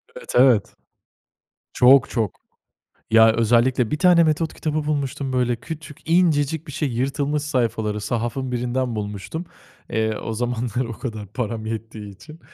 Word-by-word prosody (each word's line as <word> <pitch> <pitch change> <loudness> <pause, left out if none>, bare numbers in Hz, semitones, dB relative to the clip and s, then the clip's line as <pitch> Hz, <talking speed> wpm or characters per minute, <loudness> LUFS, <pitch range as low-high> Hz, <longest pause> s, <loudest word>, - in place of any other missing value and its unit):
Evet, - - -9
evet. 125 -5 +4 1.0
Çok, 130 +2 +5
çok. 110 -6 -1 0.8
Ya, 110 0 +6
özellikle 120 +1 +2
bir 150 - -1
tane 175 -2 +5
metot 160 +1 0
kitabı 155 -1 -2
bulmuştum 140 -2 -2
böyle 125 -2 +1
küçük, 155 +5 -9
incecik 160 -3 +2
bir 145 - -8
şey 150 +1 -1
yırtılmış 140 +4 -1
sayfaları, 115 -7 -1
sahafın 120 +4 -3
birinden 125 0 -1
bulmuştum, 105 - -5 0.5
eee, 110 -1 0
o 115 - -5
zamanlar 120 +1 -2
o 115 - -6
kadar 110 -5 -5
param 110 -2 -3
yettiği 110 -2 -6
için. 155 - -14
125 Hz, 140 wpm, -22 LUFS, 115-145 Hz, 1.0 s, Ya